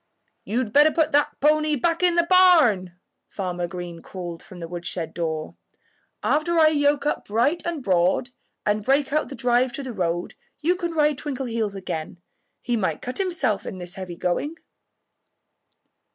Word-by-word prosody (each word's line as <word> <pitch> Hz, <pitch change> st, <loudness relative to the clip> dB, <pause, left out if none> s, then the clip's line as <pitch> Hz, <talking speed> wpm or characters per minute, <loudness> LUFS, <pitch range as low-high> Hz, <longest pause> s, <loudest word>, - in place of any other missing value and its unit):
"You'd 230 Hz, -1 st, -2 dB
better 295 Hz, +2 st, +7 dB
put 315 Hz, 0 st, +1 dB
that 290 Hz, 0 st, +1 dB
pony 305 Hz, +1 st, +3 dB
back 335 Hz, +6 st, 0 dB
in 355 Hz, -1 st, +3 dB
the 340 Hz, -1 st, +3 dB
barn," 320 Hz, -, +5 dB, 0.3 s
Farmer 180 Hz, -3 st, -3 dB
Green 175 Hz, -1 st, -7 dB
called 175 Hz, -3 st, -7 dB
from 185 Hz, -4 st, -12 dB
the 165 Hz, -, -6 dB
woodshed 170 Hz, -1 st, -4 dB
door. 160 Hz, -2 st, -3 dB, 0.7 s
"After 335 Hz, +3 st, +1 dB
I 315 Hz, -1 st, +7 dB
yoke 290 Hz, -1 st, +2 dB
up 295 Hz, -, -1 dB
Bright 240 Hz, +11 st, +1 dB
and 330 Hz, -5 st, -3 dB
Broad 185 Hz, +6 st, +2 dB, 0.3 s
and 210 Hz, 0 st, +1 dB
break 275 Hz, +3 st, +2 dB
out 305 Hz, -, +1 dB
the 275 Hz, -, -7 dB
drive 245 Hz, 0 st, +2 dB
to 280 Hz, -, -4 dB
the 255 Hz, -2 st, -6 dB
road 175 Hz, -3 st, -2 dB, 0.3 s
you 340 Hz, +5 st, +2 dB
can 345 Hz, -2 st, -4 dB
ride 300 Hz, -3 st, +2 dB
Twinkleheels 235 Hz, -8 st, -3 dB
again. 170 Hz, -4 st, -5 dB, 0.5 s
He 245 Hz, -, 0 dB
might 185 Hz, -8 st, -1 dB
cut 250 Hz, +7 st, -3 dB
himself 345 Hz, -, 0 dB
in 190 Hz, -, -6 dB
this 175 Hz, 0 st, -7 dB
heavy 185 Hz, -3 st, -7 dB
going." 180 Hz, -, -2 dB
245 Hz, 165 wpm, -24 LUFS, 180-305 Hz, 0.7 s, better